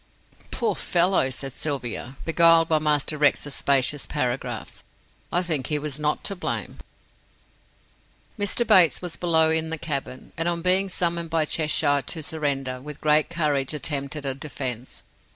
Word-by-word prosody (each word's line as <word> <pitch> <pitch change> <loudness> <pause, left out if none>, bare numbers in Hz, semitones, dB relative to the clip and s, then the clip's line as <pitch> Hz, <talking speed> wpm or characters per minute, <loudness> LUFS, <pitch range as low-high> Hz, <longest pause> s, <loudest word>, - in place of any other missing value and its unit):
"Poor 225 -4 -1
fellow," 175 -6 +2
said 135 0 -5
Sylvia, 130 -3 -4
beguiled 165 0 +5
by 155 -1 +2
Master 150 0 0
Rex's 145 -1 +2
specious 140 +1 +1
paragraphs, 125 -3 -3 0.5
"I 175 - +2
think 155 -7 -1
he 150 - 0
was 150 -1 -4
not 150 0 -1
to 200 - 0
blame." 185 - -4 1.6
"Mr. 205 +4 +1
Bates 185 -8 +5
was 175 -2 -4
below 160 -2 +2
in 160 0 0
the 165 - -3
cabin, 140 -4 -5
and 165 +1 0
on 170 -1 -1
being 190 +2 +2
summoned 170 -2 0
by 160 -1 +1
Cheshire 150 -2 +1
to 160 +3 -3
surrender, 135 -4 -2
with 150 +1 -9
great 150 0 +3
courage 150 -4 -1
attempted 145 0 -3
a 135 - 0
defence. 130 -3 -5
150 Hz, 150 wpm, -24 LUFS, 140-170 Hz, 1.6 s, beguiled